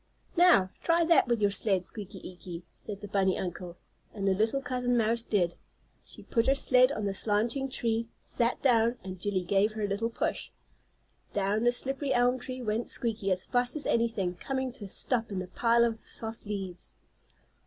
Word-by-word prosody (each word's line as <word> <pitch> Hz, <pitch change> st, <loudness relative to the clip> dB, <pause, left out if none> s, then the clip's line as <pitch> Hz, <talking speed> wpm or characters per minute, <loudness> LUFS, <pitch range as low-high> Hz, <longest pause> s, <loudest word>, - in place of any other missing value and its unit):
"Now, 340 Hz, -, +5 dB
try 335 Hz, 0 st, +3 dB
that 330 Hz, -5 st, +5 dB
with 235 Hz, -3 st, +1 dB
your 200 Hz, -, +4 dB
sled, 195 Hz, -2 st, +1 dB
Squeaky 200 Hz, -2 st, -9 dB
Eeky," 180 Hz, -1 st, -8 dB
said 205 Hz, -2 st, -7 dB
the 205 Hz, -, -6 dB
bunny 190 Hz, -2 st, +1 dB
uncle. 180 Hz, -1 st, -5 dB, 0.4 s
And 200 Hz, -2 st, -2 dB
the 195 Hz, -, +4 dB
little 220 Hz, +7 st, +1 dB
cousin 250 Hz, -2 st, 0 dB
mouse 230 Hz, +1 st, +2 dB
did. 180 Hz, -7 st, +1 dB, 0.5 s
She -, -, -11 dB
put 230 Hz, +1 st, +1 dB
her 270 Hz, -, +5 dB
sled 255 Hz, -1 st, +5 dB
on 215 Hz, -7 st, -3 dB
the 200 Hz, -, -1 dB
slanting 225 Hz, +7 st, 0 dB
tree, 230 Hz, -2 st, -1 dB
sat 235 Hz, +1 st, +1 dB
down 235 Hz, -2 st, +3 dB
and 185 Hz, -1 st, -7 dB
Jillie 190 Hz, -2 st, -1 dB
gave 200 Hz, +3 st, +2 dB
her 215 Hz, -1 st, -4 dB
a -, -, +1 dB
little 200 Hz, +3 st, -1 dB
push. 230 Hz, -, -2 dB, 0.8 s
Down 205 Hz, +2 st, +1 dB
the 240 Hz, -, +5 dB
slippery 270 Hz, +2 st, -1 dB
elm 245 Hz, +1 st, +3 dB
tree 255 Hz, 0 st, -6 dB
went 220 Hz, +1 st, -1 dB
Squeaky 220 Hz, -4 st, -1 dB
as 185 Hz, 0 st, +1 dB
fast 245 Hz, +2 st, 0 dB
as 300 Hz, -, -3 dB
anything, 225 Hz, -6 st, +1 dB
coming 265 Hz, +4 st, -2 dB
to 235 Hz, -4 st, -9 dB
a -, -, -9 dB
stop 230 Hz, +1 st, -1 dB
in 195 Hz, -, -2 dB
a 185 Hz, -, -3 dB
pile 235 Hz, +5 st, +3 dB
of 225 Hz, -1 st, -1 dB
soft 225 Hz, -1 st, -5 dB
leaves. 195 Hz, -4 st, -5 dB
225 Hz, 190 wpm, -29 LUFS, 195-245 Hz, 0.8 s, Now